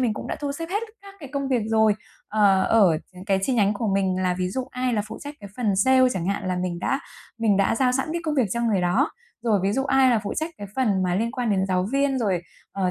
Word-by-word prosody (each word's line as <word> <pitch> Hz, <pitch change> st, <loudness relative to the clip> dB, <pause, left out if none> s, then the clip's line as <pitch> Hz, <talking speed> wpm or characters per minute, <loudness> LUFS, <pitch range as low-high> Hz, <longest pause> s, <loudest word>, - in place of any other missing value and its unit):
mình 235 Hz, -4 st, +1 dB
cũng -, -, -6 dB
đã -, -, -3 dB
thu 285 Hz, -1 st, -2 dB
xếp 330 Hz, +3 st, -5 dB
hết 410 Hz, +3 st, 0 dB, 0.2 s
các 395 Hz, 0 st, -12 dB
cái 280 Hz, -, -8 dB
công 275 Hz, -1 st, -2 dB
việc 250 Hz, -5 st, +1 dB
rồi, 220 Hz, -1 st, +3 dB, 0.3 s
ờ, 200 Hz, -3 st, +4 dB
ở 190 Hz, -8 st, +4 dB
những 180 Hz, +1 st, -11 dB
cái 195 Hz, -2 st, +2 dB
chi 260 Hz, -, +1 dB
nhánh 205 Hz, -3 st, +3 dB
của 220 Hz, +2 st, -2 dB
mình 190 Hz, -1 st, +1 dB
là 180 Hz, -1 st, +1 dB
ví 180 Hz, 0 st, 0 dB
dụ 255 Hz, +7 st, -3 dB
ai 250 Hz, 0 st, -1 dB
là 210 Hz, -3 st, +1 dB
phụ 220 Hz, -, -7 dB
trách 290 Hz, +1 st, -7 dB
cái 200 Hz, -, -9 dB
phần 215 Hz, -6 st, 0 dB
sale 260 Hz, +5 st, +5 dB
chẳng 175 Hz, -2 st, -3 dB
hạn 200 Hz, 0 st, -2 dB
là 180 Hz, -, 0 dB
mình 180 Hz, -1 st, -2 dB
đã 270 Hz, +9 st, -1 dB, 0.4 s
mình 215 Hz, -4 st, +2 dB
đã 195 Hz, +2 st, +2 dB
giao 250 Hz, +1 st, +2 dB
sẵn 265 Hz, +3 st, -1 dB
cái 340 Hz, -, -2 dB
công 305 Hz, -1 st, -1 dB
việc 255 Hz, -6 st, +2 dB
cho 235 Hz, -, -1 dB
người 220 Hz, -5 st, +1 dB
đó, 180 Hz, -, +2 dB, 0.3 s
rồi 220 Hz, -4 st, +2 dB
ví 195 Hz, -, +1 dB
dụ 270 Hz, +4 st, 0 dB
ai 270 Hz, -1 st, +4 dB
là 230 Hz, -3 st, +2 dB
phụ -, -, -3 dB
trách 315 Hz, +2 st, -2 dB
cái 205 Hz, -, -6 dB
phần 210 Hz, -8 st, +2 dB
mà 180 Hz, -1 st, 0 dB
liên 230 Hz, +4 st, 0 dB
quan 250 Hz, -4 st, -2 dB
đến 190 Hz, -1 st, +1 dB
giáo 185 Hz, 0 st, +1 dB
viên, 275 Hz, -1 st, +1 dB
rồi, 190 Hz, -7 st, 0 dB, 0.3 s
ờ, 185 Hz, -2 st, 0 dB
220 Hz, 285 wpm, -24 LUFS, 190-260 Hz, 0.4 s, sale